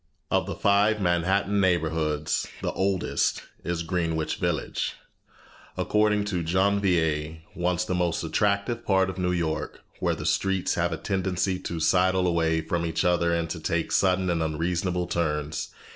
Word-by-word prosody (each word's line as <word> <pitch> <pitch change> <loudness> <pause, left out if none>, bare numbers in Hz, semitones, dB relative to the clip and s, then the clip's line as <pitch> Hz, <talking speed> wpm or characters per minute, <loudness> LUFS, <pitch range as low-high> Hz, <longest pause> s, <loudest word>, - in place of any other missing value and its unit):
Of - - +2
the - - -3
five 105 +2 +3
Manhattan 95 +3 +1
neighborhoods 80 -4 0 0.2
the - - 0
oldest 95 -1 0 0.2
is 85 -1 -2
Greenwich 80 -2 -1
Village, 85 -5 -2 0.8
according 105 -1 +2
to 95 -4 -1
Janvier 85 -4 +1 0.2
once 90 0 0
the 90 - -2
most 90 -2 0
attractive 100 +7 0
part 95 -3 +2
of 95 - -9
New 90 0 +1
York, 80 -3 -2 0.2
where - - +1
the - - -6
streets 95 -2 +1
"have 85 0 0
a 80 - -2
tendency 95 -1 -1
to 85 -2 -4
sidle 95 +2 +3
away 80 -2 +1
from 85 +2 -2
each 85 +2 -1
other 85 -1 +2
and 85 -1 0
to 85 - -4
take 85 +1 -1
sudden 95 -1 +2
and 85 -1 0
unreasonable 85 +3 -1
turns." 75 -3 -2
90 Hz, 150 wpm, -26 LUFS, 80-95 Hz, 0.8 s, five